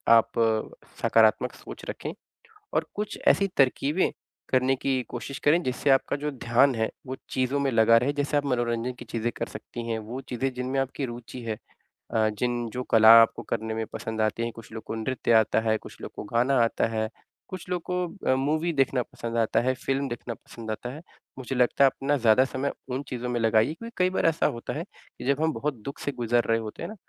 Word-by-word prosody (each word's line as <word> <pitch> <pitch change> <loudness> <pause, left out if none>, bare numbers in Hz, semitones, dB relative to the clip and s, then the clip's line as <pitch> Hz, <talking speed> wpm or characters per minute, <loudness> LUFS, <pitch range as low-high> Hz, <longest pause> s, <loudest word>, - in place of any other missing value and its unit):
आप 115 0 +4 0.7
सकारात्मक - - +4
सोच - - -10
रखें, - - -5 0.6
और - - +1
कुछ 210 +1 -3
ऐसी 200 - +5
तरकीबें 140 +5 +2 0.4
करने 130 +1 +3
की 130 0 0
कोशिश 130 +3 -6
करें 160 +4 +4
जिससे 130 +2 -1
आपका 135 -1 +3
जो 150 +1 -3
ध्यान 125 +1 +3
है, 110 0 0 0.2
वो 130 - -3
चीज़ों 130 +2 0
में 140 -1 +1
लगा 115 0 +6
रहे। 125 +5 +1
जैसे 145 0 0
आप 145 - 0
मनोरंजन 120 -2 0
की - - -8
चीज़ें 115 0 -2
कर - - -2
सकती 115 +2 -8
हैं, 115 -1 -1
वो 115 +5 -6
चीज़ें 130 +1 -2
जिनमें 125 +2 -2
आपकी 135 +1 -3
रूचि 120 +1 -8
है। 110 -2 -3 0.6
अ, 110 -1 +4
जिन 120 +2 -2
जो 125 +3 -4
कला 110 0 +9
आपको 115 - +1
करने 110 0 -3
में 110 0 -2
पसंद 110 0 -3
आती 110 +2 0
हैं, 115 - -2
कुछ 115 -1 -12
लोग 110 - -6
को - - -5
नृत्य 120 +2 -1
आता 110 -1 +4
है, 110 -1 +1
कुछ - - -13
लोग - - -7
को - - -6
गाना 120 +5 +2
आता 115 - +1
है, 110 -1 -2 0.4
कुछ 185 -1 -8
लोग 180 -1 -1
को 180 0 0 0.2
अ, - - +5
मूवी 155 +5 0
देखना 135 -3 +2
पसंद 115 0 -6
आता 115 -1 +2
है, 130 +2 +1
फ़िल्म 135 +1 0
देखना 120 0 -5
पसंद 115 0 -9
आता 115 +3 -4
है। 150 - -9 0.4
मुझे 130 +1 -4
लगता 125 +2 +3
है 135 - +8
अपना 140 +2 -1
ज़्यादा 120 0 +5
समय 135 +1 -2 0.2
उन 130 +2 -1
चीज़ों 125 -1 -4
में 120 -1 -1
लगाइए 115 +4 +3
क्योंकि 230 +7 -9
कई 185 0 +3
बार - - 0
ऐसा 165 0 +2
होता 115 - -4
है - - -3 0.4
कि - - -6
जब 140 +2 +1
हम 160 0 +2
बहुत 150 0 -2
दुःख 140 - -6
से 145 - -2
गुज़र 120 -1 +1
रहे 115 - +2
होते 110 -1 -7
हैं - - -4
ना, 215 - -8
125 Hz, 220 wpm, -26 LUFS, 115-140 Hz, 0.7 s, कला